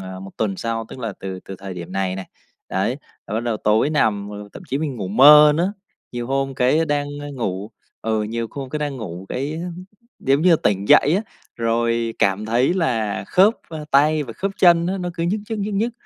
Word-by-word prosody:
à, 95 Hz, 0 st, -7 dB
1 95 Hz, 0 st, -9 dB
tuần 100 Hz, -4 st, -1 dB
sau, 115 Hz, -1 st, -3 dB
tức -, -, -10 dB
là 115 Hz, -4 st, -4 dB
từ 95 Hz, -1 st, -6 dB
từ 95 Hz, -, -7 dB
thời 95 Hz, -1 st, -7 dB
điểm 90 Hz, 0 st, -8 dB
này 95 Hz, -1 st, -1 dB
này, 95 Hz, -, -6 dB, 0.4 s
đấy, -, -, -1 dB, 0.3 s
là 105 Hz, -, -5 dB
bắt 110 Hz, -, 0 dB
đầu 120 Hz, -2 st, -1 dB
tối 110 Hz, +8 st, +2 dB
nằm 105 Hz, -9 st, +1 dB
mà 105 Hz, -, -7 dB, 0.2 s
thậm -, -, -10 dB
chí 135 Hz, -, -1 dB
mình 150 Hz, -4 st, -3 dB
ngủ 100 Hz, -5 st, -4 dB
mơ 150 Hz, +7 st, +8 dB
nữa. 180 Hz, +4 st, +1 dB, 0.4 s
Nhiều 120 Hz, -1 st, -4 dB
hôm 135 Hz, +1 st, -1 dB
cái 130 Hz, +6 st, +2 dB
đang, 145 Hz, -1 st, 0 dB, 0.2 s
a, 145 Hz, -, -6 dB
ngủ, 100 Hz, -3 st, -3 dB, 0.3 s
ừ, 110 Hz, -1 st, 0 dB
nhiều 115 Hz, +2 st, -3 dB
hôm 135 Hz, -2 st, -7 dB
cái 150 Hz, -, -2 dB
đang 145 Hz, -2 st, -3 dB
ngủ 95 Hz, -5 st, -7 dB
cái 145 Hz, +5 st, -3 dB, 0.6 s
giống 135 Hz, +3 st, +2 dB
như 180 Hz, -, +5 dB
là 165 Hz, -, +6 dB
tỉnh 100 Hz, 0 st, 0 dB
dậy 150 Hz, -, +6 dB
á, 205 Hz, -, -1 dB, 0.3 s
rồi 115 Hz, 0 st, 0 dB
cảm 100 Hz, +2 st, +1 dB
thấy 120 Hz, +8 st, +2 dB
là 115 Hz, -, -1 dB
khớp, 200 Hz, +5 st, +4 dB
ơ, 155 Hz, -2 st, -7 dB
tay 150 Hz, +2 st, +4 dB
và 125 Hz, -5 st, -7 dB
khớp 195 Hz, -, -3 dB
chân 170 Hz, -2 st, +5 dB
á 190 Hz, +2 st, -1 dB
nó 180 Hz, -1 st, -3 dB
cứ 165 Hz, -, -3 dB
nhức 205 Hz, +5 st, 0 dB
nhức, 220 Hz, -, -2 dB
nhức 205 Hz, 0 st, -2 dB
nhức, 225 Hz, +5 st, 0 dB
125 Hz, 230 wpm, -21 LUFS, 105-155 Hz, 0.6 s, mơ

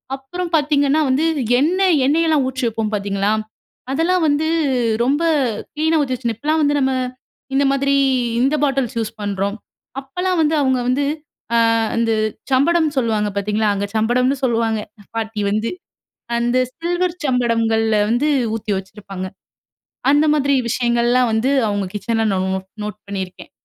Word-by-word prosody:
அப்புறம் 335 Hz, +6 st, -6 dB
பாத்தீங்கன்னா, 290 Hz, 0 st, +2 dB
வந்து 270 Hz, +5 st, +2 dB, 0.3 s
எண்ண 335 Hz, +7 st, +1 dB, 0.3 s
எண்ணெயெல்லாம் 310 Hz, 0 st, +2 dB
ஊற்றி 260 Hz, 0 st, -4 dB
வப்போம் 225 Hz, -1 st, -2 dB
பாத்தீங்களா? 200 Hz, 0 st, -1 dB, 0.6 s
அதெல்லாம் 335 Hz, +5 st, +1 dB
வந்து 295 Hz, +2 st, +1 dB, 0.6 s
ரொம்ப 285 Hz, +6 st, +1 dB, 0.5 s
க்ளீனா 315 Hz, +1 st, +1 dB
ஊத்தி 265 Hz, -3 st, -1 dB
வச்சு, 235 Hz, -2 st, -2 dB
இப்பலாம் 310 Hz, +6 st, 0 dB
வந்து 290 Hz, 0 st, +2 dB
நம்ம 265 Hz, -1 st, +1 dB, 0.6 s
இந்த 280 Hz, +1 st, +3 dB
மாதிரி, 275 Hz, 0 st, +1 dB, 0.5 s
இந்த 275 Hz, +4 st, +2 dB
பாட்டில்ஸ் 270 Hz, -5 st, 0 dB
யூஸ் 220 Hz, -1 st, -3 dB
பண்றோம். 200 Hz, 0 st, -2 dB, 0.4 s
அப்பலாம் 360 Hz, +6 st, -2 dB
வந்து 315 Hz, 0 st, +2 dB
அவுங்க 260 Hz, -2 st, +2 dB
வந்து 275 Hz, +3 st, +1 dB, 0.5 s
அ -, -, +4 dB, 0.4 s
அந்த 230 Hz, -1 st, +1 dB, 0.4 s
சம்படம்னு 310 Hz, +3 st, +2 dB
சொல்வாங்க 220 Hz, -4 st, +1 dB
பாத்தீங்களா? 210 Hz, +2 st, 0 dB
அங்க 200 Hz, +1 st, -2 dB
சம்படம்னு 250 Hz, +5 st, +2 dB
சொல்லுவாங்க, 230 Hz, -3 st, +1 dB
எங்க 210 Hz, -2 st, -20 dB
பாட்டி 220 Hz, -1 st, -3 dB
வந்து, 215 Hz, +2 st, 0 dB, 0.7 s
அந்த 240 Hz, +1 st, 0 dB, 0.2 s
சில்வர் 350 Hz, +1 st, -1 dB
சம்படங்கள்ல 230 Hz, -3 st, +1 dB
வந்து 260 Hz, +6 st, +2 dB, 0.3 s
ஊத்தி 215 Hz, -1 st, -3 dB
வச்சிருப்பாங்க. 195 Hz, -1 st, -7 dB, 0.8 s
அந்த 295 Hz, +1 st, +4 dB
மாதிரி 280 Hz, -2 st, +2 dB
விஷயங்கள்லாம் 240 Hz, 0 st, +2 dB
வந்து 225 Hz, +5 st, +1 dB, 0.2 s
அவுங்க 205 Hz, -1 st, -1 dB
கிச்சன்ல் 225 Hz, +1 st, 0 dB
நா 190 Hz, -, 0 dB, 0.2 s
நோட் 190 Hz, 0 st, -5 dB, 0.2 s
நோட் 210 Hz, 0 st, -6 dB
பண்ணிருக்கேன். 190 Hz, -2 st, -6 dB
250 Hz, 135 wpm, -19 LUFS, 220-290 Hz, 0.8 s, அ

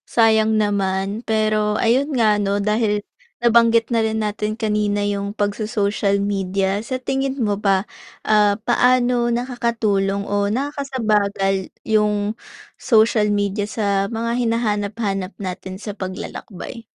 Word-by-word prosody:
Sayang 220 Hz, -1 st, +3 dB
naman 200 Hz, 0 st, 0 dB
pero, 215 Hz, -2 st, +1 dB
ayun 255 Hz, +6 st, +2 dB
nga, 215 Hz, -3 st, +3 dB
ano, 200 Hz, 0 st, 0 dB
dahil 210 Hz, 0 st, 0 dB, 0.4 s
nabanggit 230 Hz, -1 st, +4 dB
na 230 Hz, -2 st, +1 dB
rin 220 Hz, 0 st, -1 dB
natin 210 Hz, 0 st, -2 dB
kanina 210 Hz, -2 st, 0 dB
'yong 200 Hz, 0 st, -2 dB
pagso-social 205 Hz, -1 st, 0 dB
media, 195 Hz, -1 st, -1 dB
sa 260 Hz, +2 st, -2 dB
tingin 270 Hz, +1 st, -2 dB
mo 205 Hz, -3 st, 0 dB
ba, 195 Hz, -1 st, +1 dB, 0.4 s
ah, 210 Hz, -1 st, +4 dB
paano 245 Hz, 0 st, +3 dB
nakakatulong 230 Hz, -5 st, 0 dB
o 205 Hz, 0 st, +1 dB
nakakasagabal 215 Hz, -7 st, -1 dB, 0.2 s
'yong 210 Hz, -1 st, +1 dB, 0.4 s
social 220 Hz, -2 st, +3 dB
media 205 Hz, 0 st, -1 dB
sa 200 Hz, -3 st, 0 dB
mga 230 Hz, +1 st, -1 dB
hinahanap-hanap 205 Hz, -3 st, -1 dB
natin 185 Hz, 0 st, -6 dB
sa 210 Hz, -, -5 dB
paglalakbay? 190 Hz, +4 st, -7 dB
210 Hz, 115 wpm, -20 LUFS, 200-230 Hz, 0.4 s, nabanggit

